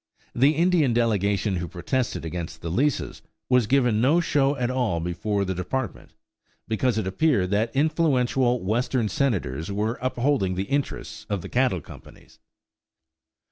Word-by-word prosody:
The 140 +5 +3
Indian 165 -6 +3
delegation 105 -4 +1
who 85 0 -3
protested 95 +4 -2
against 80 -1 -5
the 85 - -4
leases 140 - 0 0.3
was 125 -4 +3
given 125 -4 +2
no 145 +7 +4
show 145 -4 +2
at 125 -2 -1
all 120 -10 0
before 100 +4 -1
the 95 - -2
Department, 105 +6 -4 0.5
because 110 +1 0
it 110 - -1
appeared 95 - +1
that 110 +5 0
influential 135 - +2
Western 115 +2 0
Senators 95 - -1
were 105 +4 -2
upholding 125 -6 0
the 95 - -1
interests 135 -3 -3
of 100 -4 -2
the - - -7
cattle 125 -8 +1
companies. - - -15
120 Hz, 140 wpm, -25 LUFS, 95-135 Hz, 0.5 s, no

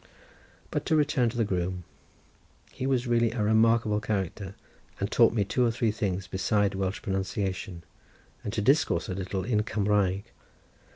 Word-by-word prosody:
But - - -1
to 160 - +3
return 145 -5 +2
to 120 - -7
the 115 - +3
groom. 90 -2 -2 0.9
He 130 - -4
was 130 -2 +1
really 120 -1 +2
a 115 -4 -1
remarkable 110 0 +3
character, 100 -1 -3 0.4
and 100 +2 -2
taught 115 -2 +5
me 110 -3 +1
two 125 +6 +1
or 120 - +3
three 115 -1 0
things 95 -3 -2
besides 100 +1 0
Welsh 95 +1 -2
pronunciation; 95 -3 -3 0.6
and 105 - -3
to 110 - -1
discourse 135 - +2
a - - -2
little 95 0 -3
in 105 0 +1
Cumraeg. 100 -3 +1
105 Hz, 160 wpm, -28 LUFS, 95-115 Hz, 0.9 s, taught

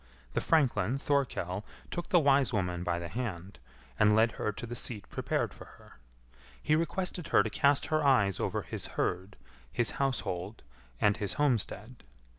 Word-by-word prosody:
The - - 0
franklin 135 -5 +2
Thorkell 125 -10 -1 0.3
took 175 - -4
the 185 - +5
wise 140 -4 +4
woman 90 -5 -1
by 85 - 0
the 85 0 -5
hand, 100 -5 -5 0.4
and 105 0 +5
led 115 +1 +4
her 105 - -2
to 105 - -6
the 120 +1 -6
seat 110 -4 -3
prepared - - -1
for - - -12
her. - - -18 0.6
He 155 - +2
requested 170 +1 -2
her - - +4
to - - -4
cast 140 0 +3
her 155 -1 +2
eyes 105 -9 +3
over - - -1
his - - -5
herd, 95 +3 -1 0.4
his 120 -3 +2
household, 105 -7 -2 0.4
and 105 0 +3
his 100 -2 -2
homestead. 125 -3 -1
115 Hz, 165 wpm, -30 LUFS, 100-140 Hz, 0.6 s, the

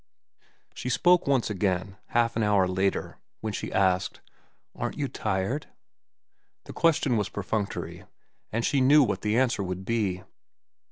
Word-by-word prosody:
She 125 - -5
spoke 175 +6 +3
once 130 -5 +2
again, 95 -1 -1
half 115 0 +1
an 115 - 0
hour 105 -3 +3
later, 95 +1 -1 0.2
when 110 -1 -3
she - - -4
asked, 95 -1 +1 0.6
"Aren't - - -4
you 145 - -1
tired?" 110 +6 -2 1.0
The - - -10
question 145 -7 +2
was 105 -2 -1
perfunctory, 100 +1 -4 0.5
and 115 +2 -1
she 140 - +2
knew 145 +3 +6
what 100 -6 -1
the 105 +2 +1
answer 125 -5 +2
would 95 0 -4
be. 100 -5 -1
105 Hz, 145 wpm, -27 LUFS, 95-125 Hz, 1.0 s, knew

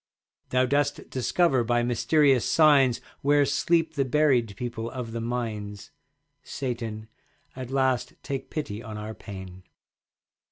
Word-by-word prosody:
Thou 130 0 +3
dost 145 +2 -1
discover 135 0 +2
by 120 +1 +1
mysterious 135 +2 +3
signs 140 -6 +4 0.2
Where 145 0 +4
sleep 160 +3 +1
the 140 -3 +1
buried 130 -6 +2
people 115 -2 -4
of 125 -2 -6
the 115 0 -4
mines. 110 -4 -4 0.5
Satan, 115 -4 -5 0.5
at 130 -1 -6
last 130 -2 0
take 135 -1 -4
pity 115 -9 -4
on 110 -2 -7
our 105 +1 -6
pain. 95 -4 -9
125 Hz, 125 wpm, -26 LUFS, 115-140 Hz, 0.5 s, signs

